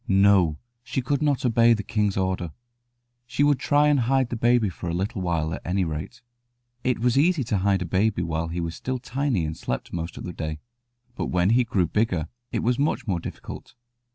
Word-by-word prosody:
No, 95 -5 +4 0.3
she 125 - -2
could 140 +2 0
not 145 -4 +1
obey 115 0 +5
the 105 - -4
king's 105 -2 0
order. 95 -4 -1 0.7
She 140 - 0
would 145 -3 +3
try 145 +2 +3
and 145 -2 +4
hide 130 +1 +2
the 120 - -3
baby 120 -1 +3
for 90 -1 -5
a 85 - -1
little 95 +2 -2
while, 80 -3 -1
at - - -5
any 95 +1 0
rate. 80 +11 -6 0.6
It 125 - +1
was 125 +3 +2
easy 165 -1 +3
to 110 -4 0
hide 95 -1 +2
a - - -5
baby 95 +1 +1
while 80 0 -2
he 85 +1 -3
was 85 0 -3
still 130 +8 -3
tiny 125 - -1
and 80 0 -4
slept 65 - -4
most 85 0 -4
of - - -7
the 90 - -5
day; 75 -2 -4 0.5
but - - -3
when 90 +2 +2
he 125 +2 +4
grew 100 -6 +1
bigger 90 -4 0 0.2
it - - -1
was 120 +2 +1
much 145 +2 0
more 95 -5 0
difficult. - - -8
100 Hz, 210 wpm, -25 LUFS, 85-125 Hz, 0.7 s, obey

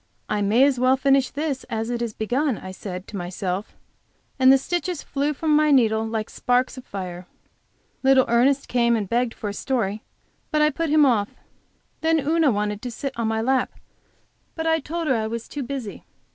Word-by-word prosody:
"I 210 - -1
may 215 +6 +4
as 275 -3 +3
well 255 +1 +4
finish 270 -1 +3
this 285 -2 -3
as 225 +1 -3
it 240 -1 -2
is 230 -3 -3
begun," 250 +3 0
I 185 - -8
said 185 -1 -7
to - - -8
myself, 185 +2 -4 0.6
and 260 0 +7
the 270 - +7
stitches 350 +3 -3
flew 285 +2 -1
from 305 +1 +1
my 305 0 +4
needle 225 -6 +4
like 220 -1 -3
sparks 250 +1 0
of 255 - -10
fire. 180 -2 -6 0.7
Little 265 -1 +5
Ernest 260 +4 +2
came 235 -1 +2
and 210 -3 -2
begged 235 +2 0
for 210 - -5
a - - -5
story, 215 -3 -2 0.5
but 305 - +1
I 300 0 +4
put 330 +3 -2
him 300 0 +5
off. 215 -6 +2 0.7
Then 320 0 +2
Una 310 +1 +2
wanted 210 -2 -1
to 250 - -4
sit 265 +3 -5
in 230 -1 -1
my 220 0 0
lap, 260 +2 +1 0.8
but 320 - -3
I 320 0 +3
told 330 +3 -4
her 280 - +2
I 220 -2 -1
was 230 +1 -5
too 290 - -5
busy. 255 -5 -6
250 Hz, 200 wpm, -23 LUFS, 220-280 Hz, 0.8 s, and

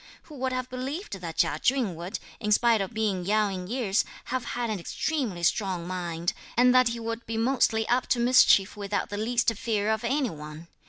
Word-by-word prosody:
Who 310 - -13
would 260 0 -1
have 255 -1 -2
believed 265 - -5
that 165 -2 -6
Chia 150 - +2
Chün 250 -8 +1
would, 175 +5 -5 0.2
in 210 -2 -2
spite 230 0 +4
of 195 - -3
being 215 -5 -1
young 210 +1 +1
in 180 -1 -5
years, 225 -3 +1 0.2
have 255 -1 -2
had 240 -2 -1
an 210 - -2
extremely 220 - -2
strong 185 -1 0
mind, 175 -2 -2 0.2
and 250 +1 +6
that 255 -1 +5
he 235 0 -2
would 230 +1 -4
be 225 0 -3
mostly 225 -2 +2
up 245 +2 +1
to 245 - +1
mischief 235 -5 +5
without 205 0 -2
the 205 - -3
least 235 +2 +1
fear 215 -2 -1
of 220 +1 -1
any 265 +1 0
one. 150 +2 -10
220 Hz, 205 wpm, -27 LUFS, 190-245 Hz, 0.2 s, and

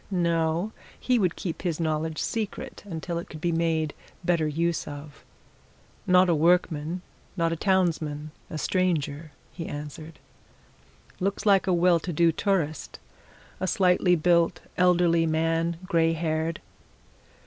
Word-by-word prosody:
No 170 +1 0 0.3
he 250 -2 +2
would 180 -4 +1
keep 170 -4 -5
his 175 -3 -2
knowledge 160 -1 -1
secret 225 - -4
until 170 -1 -4
it 170 - -9
could 155 - -9
be 170 +2 0
made 160 -2 0 0.3
better 170 -3 +2
use 165 +2 -1
of. 145 0 -9 0.8
"Not 180 0 +6
a 175 - +3
workman 165 +1 +1 0.3
not 165 -1 +1
a - - -1
townsman 160 -5 0 0.2
a 155 - -5
stranger," 155 -4 -1 0.2
he 165 0 -6
answered. 150 +2 -7 1.0
"Looks 200 +3 -2
like 195 -2 +4
a 185 - +3
well 175 0 +4
to 175 - -5
do 170 +1 +3
tourist. 160 -5 -1 0.6
A 190 - -1
slightly 180 -1 +3
built, 170 0 +2
elderly 175 -2 +3
man 165 +1 0
grey 165 -2 +2
haired." 160 0 -2
165 Hz, 135 wpm, -26 LUFS, 160-180 Hz, 1.0 s, Not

